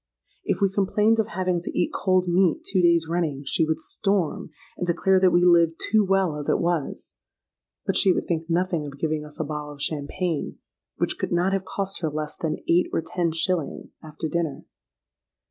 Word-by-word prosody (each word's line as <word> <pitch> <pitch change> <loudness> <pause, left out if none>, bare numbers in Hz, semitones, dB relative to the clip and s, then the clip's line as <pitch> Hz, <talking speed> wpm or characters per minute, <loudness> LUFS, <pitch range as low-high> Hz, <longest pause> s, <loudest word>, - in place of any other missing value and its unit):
If - - -1
we 195 -1 +2
complained 210 +3 +2
of 220 - +1
having 180 0 -1
to - - -6
eat 175 - 0
cold 185 -1 +1
meat 175 -1 +2
two 190 -2 +1
days 170 -1 +4
running, 160 -5 -1
she 160 - +1
would 160 - 0
storm, 195 -6 -1 0.3
and 180 - -3
declare 185 +2 +3
that 185 0 +5
we 175 0 +3
lived 170 -2 +4
too 215 0 +2
well 190 -5 +1
as 145 - -4
it - - +3
was;—but 170 -4 -5
she 190 - +4
would - - 0
think 165 -1 -2
nothing 170 -3 0
of 140 0 -9
giving 155 0 -1
us 150 +2 -12
a - - +1
bottle 150 0 -5
of 145 - -15
champagne, 155 +2 -3 0.4
which - - -1
could - - -2
not 180 +3 +2
have 195 -1 -1
cost 195 0 -3
her 160 - 0
less 150 0 -4
than 160 -2 -2
eight 175 +2 +3
or 165 - -1
ten 170 0 -1
shillings, 165 0 -2
after 155 0 -6
dinner. 165 -2 -2
170 Hz, 195 wpm, -24 LUFS, 155-185 Hz, 0.4 s, that